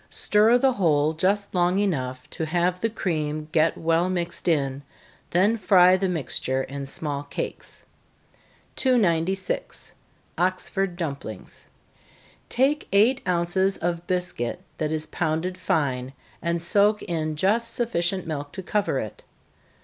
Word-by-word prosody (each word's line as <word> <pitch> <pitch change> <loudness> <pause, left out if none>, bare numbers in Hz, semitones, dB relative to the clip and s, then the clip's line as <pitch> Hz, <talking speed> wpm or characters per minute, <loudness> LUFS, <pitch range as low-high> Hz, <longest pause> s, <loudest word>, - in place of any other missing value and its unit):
Stir 215 +3 +4
the 265 +1 +3
whole 155 -6 +2
just 200 +5 0
long 180 0 +2
enough 130 -10 -1
to 160 - -3
have 175 +2 0
the 225 - +1
cream 155 -7 -2
get 160 0 +2
well 165 +2 +1
mixed 175 -1 -3
in, 140 -4 +1 0.5
then 200 +6 +3
fry 185 -3 +6
the 190 0 0
mixture 135 -5 -1
in 140 +1 -6
small 140 0 -2
cakes. 145 - -6 0.9
296. 190 - 0 0.5
Oxford 185 +1 0
Dumplings. 140 -10 -6 0.8
Take 275 +5 +1
eight 225 +7 +4
ounces 180 +2 +1
of 170 0 -3
biscuit 180 -10 -2 0.2
that 155 -1 -1
is 155 0 -2
pounded 160 +3 -2
fine, 135 -7 -1 0.3
and 170 0 0
soak 205 +5 +3
it - - -7
in 155 -2 -2
just 220 +8 +1
sufficient 190 -6 0
milk 145 -2 -4
to 190 - -6
cover 205 -6 0
it. 110 -5 -5
175 Hz, 130 wpm, -25 LUFS, 155-195 Hz, 0.9 s, fry